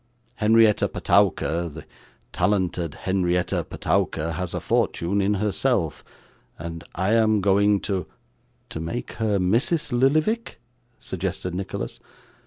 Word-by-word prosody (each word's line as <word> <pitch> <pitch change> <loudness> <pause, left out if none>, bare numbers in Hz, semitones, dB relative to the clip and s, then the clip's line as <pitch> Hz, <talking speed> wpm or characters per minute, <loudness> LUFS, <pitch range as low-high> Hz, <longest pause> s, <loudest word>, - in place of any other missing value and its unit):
Henrietta 110 -1 +4
Petowker, 85 +1 +1
the 80 +1 -10 0.5
talented 90 -5 0
Henrietta 90 -2 +1
Petowker 80 +1 -1
has 90 +1 -4
a - - -1
fortune 95 +4 0
in 100 +2 +2
herself, 105 - 0 0.5
and 85 +1 -7
I 95 +4 +1
am 110 -2 +4
going 100 +1 +3
to 95 -3 -2 0.3
' - - -41
'To - - -5
make 85 +10 -4
her 105 -2 +2
Mrs. 120 - +1
Lillyvick?' 155 - +1 0.4
suggested 90 - -4
Nicholas. 95 +1 -5
100 Hz, 115 wpm, -24 LUFS, 90-110 Hz, 0.5 s, Henrietta